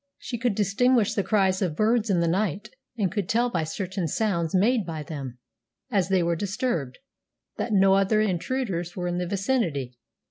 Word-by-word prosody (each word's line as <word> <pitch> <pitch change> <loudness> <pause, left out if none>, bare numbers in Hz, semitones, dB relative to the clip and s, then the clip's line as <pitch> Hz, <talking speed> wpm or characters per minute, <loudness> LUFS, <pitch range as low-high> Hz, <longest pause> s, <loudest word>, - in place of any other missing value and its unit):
She 240 -2 -6
could 235 -3 0
distinguish 215 +3 +2
the 215 - +1
cries 190 -1 +1
of 175 -6 -1
birds 220 +3 +2
in 180 -3 +2
the 170 - +1
night, 195 +3 -1 0.3
and 195 -6 0
could 195 -2 -3
tell 240 +2 +2
by 165 -6 0
certain 185 +2 -3
sounds 170 -2 0
made 220 +4 +3
by 160 -3 -5
them, 140 -5 -7 0.5
as 195 -4 +1
they 190 -2 +3
were 170 0 +1
disturbed, 185 - -2 0.6
that 240 - -3
no 195 -1 +5
other 195 +2 +3
intruders 190 -3 -1
were 180 -1 -2
in 175 0 -1
the 180 - -2
vicinity. 170 - -1
195 Hz, 180 wpm, -25 LUFS, 170-215 Hz, 0.6 s, no